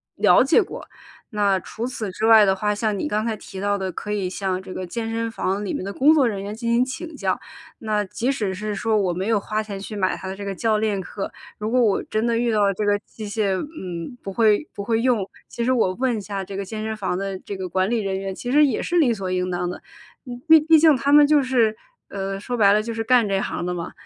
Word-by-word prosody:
了 - - +5
解 335 +10 +4
过。 - - -9 0.4
那 200 -3 +2
除 225 +5 -6
此 230 -5 -4
之 215 +4 -2
外 220 -2 +8
的 190 -1 +2
话， 210 +2 0
像 210 0 -1
你 300 - -2
刚 215 +1 0
才 225 -1 -1
提 195 -2 -10
到 205 +1 0
的 190 -1 -3
可 210 - -7
以 195 -3 -1
向 190 -1 -2
这 190 -1 -9
个 185 -1 -5
健 225 +4 -4
身 230 0 -2
房 205 -2 -2
里 - - -3
面 - - -3
的 195 - -4
工 280 +9 +4
作 295 -4 +4
人 205 -5 -1
员 205 +2 -5
进 230 +1 -2
行 245 +2 +3
请 320 +6 -7
教， 195 -9 -1 0.4
那 210 -2 -1
即 235 +7 -1
使 210 -8 -2
是 210 +3 -4
说 220 +2 0
我 190 -4 +1
没 185 +3 -3
有 225 -1 +3
花 215 +2 -2
钱 210 -2 -6
去 205 +2 -7
买 185 -2 +1
他 190 - -7
的 190 - -5
这 200 - -6
个 195 -1 -4
教 220 +2 +1
练 210 -2 0
课， 195 +2 -6 0.2
如 215 +1 -3
果 250 +2 +3
我 215 -4 +2
真 215 +1 -1
的 235 -1 +1
遇 235 -1 +1
到 210 -1 +3
了 200 -1 +3
这 210 +2 -2
个 205 0 +3
器 215 +1 -10
械， 205 -1 0
嗯， 185 - -6
不 195 - -5
会 215 +6 +2
不 - - -6
会 225 +1 +1
用， 235 -6 +1 0.2
其 235 - -3
实 255 - +3
我 220 -7 +2
问 250 +1 0
一 - - -4
下 195 0 -4
这 195 - -8
个 200 - -3
健 215 +2 -5
身 220 0 -3
房 190 -4 -2
的 195 0 -3
这 200 - -7
个 190 -1 -4
管 185 +2 0
理 235 0 +1
人 195 -2 -2
员， 195 0 -4
其 245 - -6
实 295 +3 +5
也 265 -6 0
是 350 - -1
理 275 -8 +4
所 195 -4 -4
应 180 0 -1
当 175 0 -2
的。 180 - -7 0.5
嗯， 245 0 -7
毕 320 0 +9
毕 320 +1 +5
竟 315 -1 +6
他 275 +2 0
们 295 0 +7
就 295 -1 +4
是， 240 -4 +2 0.3
呃， 195 0 -4
说 245 +5 -4
白 205 -4 +5
了 210 +1 +4
就 230 +2 -5
是 225 0 -3
干 240 -1 +4
这 195 -1 0
行 175 - -3
的 180 - -2
嘛， 175 0 -5
210 Hz, 295 characters per minute, -22 LUFS, 195-235 Hz, 0.5 s, 毕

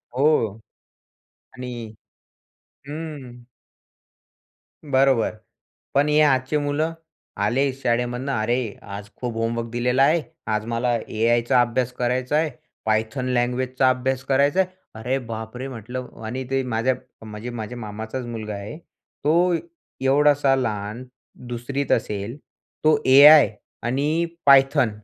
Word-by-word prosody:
हो 140 +4 +3 1.3
आणि 125 0 -6 1.2
हं. 145 -5 -7 1.4
बरोबर. 135 -4 +3 0.6
पण 140 +2 +3
हे 150 0 +4
आजचे 135 0 +3
मुलं, 150 +3 -1 0.4
आले 135 +3 +1
शाळेमधनं, 125 +1 -1
"अरे, 120 -1 0
आज 100 +1 -8
खूप 120 -2 -4
होमवर्क 115 +1 -2
दिलेला 125 +3 +2
आहे. 160 +4 +4 0.3
आज 110 0 -1
मला 120 +1 0
एआयचा 120 +2 +2
अभ्यास 120 +1 0
करायचा 125 +2 -1
आहे, 160 0 +1 0.4
Python 110 +4 0
लँग्वेजचा 125 +1 +1
अभ्यास 130 +1 -1
करायचा 140 +5 +2
आहे." 185 - -2 0.3
अरे 125 +5 -1
बापरे! 110 +4 -6
म्हटलं. 125 +1 -6 0.2
आणि 125 +4 -4
ते 135 0 +1
माझ्या, 125 +1 0 0.3
म्हणजे 105 +2 -7
माझ्या 120 0 -6
मामाचाच 110 +3 -6
मुलगा 110 -3 -5
आहे, 100 +7 -7
तो 170 +1 -1 0.5
एवढासा 140 0 +4
लहान, 110 -2 -3 0.4
2री 120 +4 -3
त - - 0
असेल, 105 +5 -1 0.5
तो 155 -1 +4
एआय 145 +3 +9 0.3
आणि 145 +8 0 0.2
Python 135 -2 +6
125 Hz, 115 wpm, -23 LUFS, 115-140 Hz, 1.4 s, एआय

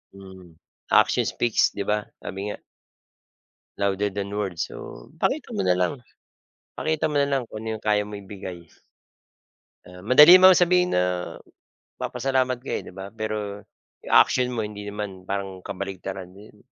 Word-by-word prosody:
Mhm. 95 -3 -13 0.3
Action - - +3
speaks 120 -2 +1
'di 100 - -2
ba 105 +1 0 0.2
sabi 95 -1 -6
nga, 105 - -5 1.3
louder 100 +1 +1
than 100 0 -4
words. 100 -5 -3
So - - -10
pakita - - -1
mo 100 - 0
nalang, 90 0 +2 0.8
pakita 155 0 0
mo 150 - -3
nalang 140 -2 +2
kung 110 +1 -8
ano - - -4
yung 110 - -16
kaya 105 -1 +2
mo 105 - -10
ibigay. 95 -4 -9 1.2
Ah, 90 0 -13
madali 150 - +8
man 185 -1 +8
sabihin 180 0 +3
na 90 - +3 0.9
papasalamat 130 0 -1
ka, 135 - -8
eh, - - -5
'di - - -11
ba 95 +1 -8
pero 105 -2 -4 0.4
'yong - - -7
action 125 -1 +5
mo 115 - -2
hindi 105 -1 -6
naman 100 -2 -6
parang 95 -1 -5
kabaligtaran 95 -1 -6
iyon. 105 0 -16
105 Hz, 150 wpm, -24 LUFS, 95-125 Hz, 1.3 s, madali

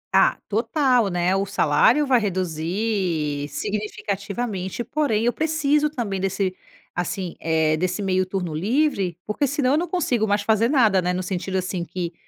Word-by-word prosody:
Ah, - - +5
total, 250 +1 +2
né? 180 +1 +1
O 195 - +1
salário 200 - +3
vai 255 -3 +4
reduzir 175 -4 -1
significativamente, 205 - -3
porém 235 -4 0
eu 240 - +2
preciso 300 -1 +1
também 225 -9 -3
desse, 195 -1 -1 0.4
assim, 180 0 -3
eh, 160 -1 +2
desse 180 +4 -1
meio 185 -1 +2
turno 185 -3 -3
livre, 195 - 0
porque, 215 +7 0
senão, 275 -2 +1
eu 290 - +3
não 345 +2 -1
consigo 260 - 0
mais 205 0 +1
fazer 220 +2 +2
nada, 225 -9 +4
né? 180 0 0
No 185 +1 -2
sentido, 185 +1 -3
assim, 185 -1 -2
que, 175 0 -5
200 Hz, 155 wpm, -23 LUFS, 180-240 Hz, 0.4 s, Ah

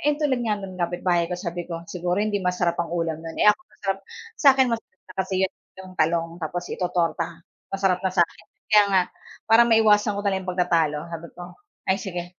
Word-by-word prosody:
Ayon, 295 +1 +1
tulad 265 -4 +2
nga 210 - +2
nung 185 -1 -8
kapitbahay 175 0 +1
ko, 180 - -3
sabi 175 -1 -5
ko, 170 -1 -5
"Siguro 180 +2 -1
hindi 210 -1 0
masarap 180 -2 0
ang 170 0 -2
ulam 165 -2 -1
no'n?" 165 0 -8
Eh, - - +4
ako 285 - -2
masarap 195 -1 -2 0.4
sa 285 - +6
akin 265 -1 +4
masarap 225 -4 -5
na - - -11
kasi 190 - -4
'yon, 190 - +1 0.3
yung 185 0 -11
talong, 165 +1 +1
tapos 175 +1 -3
itototorta, 170 -2 -1 0.3
masarap 195 -2 +2
na - - +1
sa 175 - +6
akin. 170 - -6 0.3
Kaya 210 -1 +7
nga, 190 -2 +3 0.5
para 235 +1 +7
maiwasan 215 -2 +4
ko 200 - -3
na 200 - +1
lang 190 -1 -2
'yong - - -1
pagtatalo 170 -4 +2
sabi 165 0 -6
ko, 175 - -9 0.5
"Ay, 190 - +2
sige, 180 -1 -6
180 Hz, 215 wpm, -24 LUFS, 170-200 Hz, 0.5 s, Kaya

